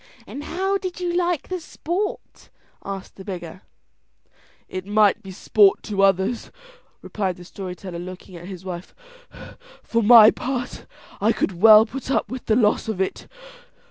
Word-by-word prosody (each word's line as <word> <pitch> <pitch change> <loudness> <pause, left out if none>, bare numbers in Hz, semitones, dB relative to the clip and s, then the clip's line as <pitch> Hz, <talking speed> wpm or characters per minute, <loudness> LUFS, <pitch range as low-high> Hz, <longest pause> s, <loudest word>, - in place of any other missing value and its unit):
"And 290 +2 -8
how 385 +3 -1
did 365 -2 -6
you 350 -1 -2
like 350 -3 0
the 370 -1 -4
sport?" 350 +5 -5 0.3
said 195 -1 -6
the 190 - -12
beggar. 180 -2 -7 1.1
"It 185 0 -6
might 210 -1 +3
be 195 - -11
sport 195 +1 +3
to 200 -2 -2
others," 195 +4 +1 0.5
replied 190 -4 -3
the 180 - -11
story 185 0 -7
teller 180 -2 -8
looking 185 +1 -9
at 175 +1 -10
his 190 -1 -9
wife, 180 -1 -7 0.9
"for 230 - 0
my 220 0 +9
part 250 -1 -5 0.3
I - - +3
could - - -1
well 220 0 +9
put 265 +4 -8
up 270 - 0
with 255 -1 -7
the 215 - +3
loss 220 -2 +2
of 220 -4 -3
it." 190 - -3
210 Hz, 160 wpm, -22 LUFS, 190-260 Hz, 1.1 s, my